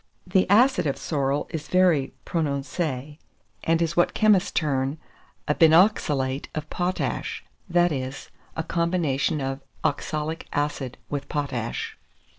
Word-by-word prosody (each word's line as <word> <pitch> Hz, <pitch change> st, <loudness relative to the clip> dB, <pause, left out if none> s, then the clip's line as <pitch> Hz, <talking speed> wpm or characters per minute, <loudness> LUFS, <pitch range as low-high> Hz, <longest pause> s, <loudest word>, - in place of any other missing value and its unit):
The 185 Hz, 0 st, +2 dB
acid 245 Hz, -, +5 dB
of 140 Hz, -, -1 dB
sorrel 140 Hz, -2 st, -1 dB
is 155 Hz, -2 st, -5 dB
very 175 Hz, -7 st, +3 dB
prononcé, 145 Hz, -1 st, -2 dB, 0.4 s
and 165 Hz, +1 st, +2 dB
is 165 Hz, 0 st, -2 dB
what 175 Hz, -, +2 dB
chemists 210 Hz, -3 st, +4 dB
term 140 Hz, -2 st, 0 dB, 0.5 s
a 150 Hz, -, +3 dB
binoxalate 155 Hz, -6 st, +3 dB
of 155 Hz, 0 st, -4 dB
potash; 180 Hz, +1 st, -2 dB, 0.3 s
that 175 Hz, 0 st, +3 dB
is, 130 Hz, -1 st, -5 dB, 0.3 s
a 160 Hz, -, 0 dB
combination 165 Hz, -4 st, 0 dB
of 135 Hz, 0 st, -2 dB, 0.2 s
oxalic 155 Hz, +2 st, -2 dB
acid 145 Hz, -3 st, -2 dB
with 140 Hz, -1 st, -3 dB
potash. 130 Hz, -6 st, -3 dB
155 Hz, 120 wpm, -25 LUFS, 140-175 Hz, 0.5 s, acid